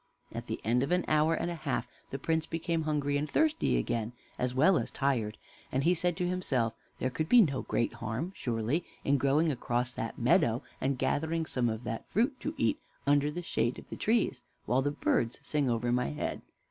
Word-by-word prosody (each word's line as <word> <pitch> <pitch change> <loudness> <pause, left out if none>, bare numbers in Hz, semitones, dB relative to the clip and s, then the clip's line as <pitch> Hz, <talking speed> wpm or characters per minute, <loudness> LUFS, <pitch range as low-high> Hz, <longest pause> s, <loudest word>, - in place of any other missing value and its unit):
At - - -5
the - - -3
end 120 +3 +2
of 140 +5 -1
an 180 0 +2
hour 155 +1 +3
and 170 +1 -2
a - - -2
half 140 -7 -2 0.2
the 135 - -3
Prince 160 +3 0
became 165 0 -1
hungry 145 -2 +1
and 150 +1 -2
thirsty 315 0 +2
again, 115 -1 -1 0.3
as 125 0 0
well 160 +7 +5
as - - -3
tired, 120 -7 0 0.3
and 130 - +1
he 175 - +5
said 175 0 0
to 180 -1 0
himself, 135 -11 0 0.2
"There 130 - -1
could 155 +4 -2
be 245 - +8
no 140 -9 +1
great 115 - 0
harm 115 - -3
surely 120 +7 -1 0.2
in 140 0 +3
going 150 +4 +3
across 120 -1 -1
that 115 - -4
meadow 125 -3 +3 0.2
and 135 0 +1
gathering 160 +5 0
some 125 -5 0
of 110 +1 -4
that 115 0 -5
fruit, 250 +5 +1
to 305 +2 -4
eat 300 - +1 0.3
under 145 +1 +4
the 175 +4 -5
shade 120 -6 0
of - - -11
the - - -3
trees, 215 - +1 0.2
while 125 +4 +2
the 145 - +1
birds 120 -4 0
sing 145 -4 0
over 120 +1 0
my 125 +1 +2
head. 70 - -3
140 Hz, 210 wpm, -31 LUFS, 120-165 Hz, 0.3 s, be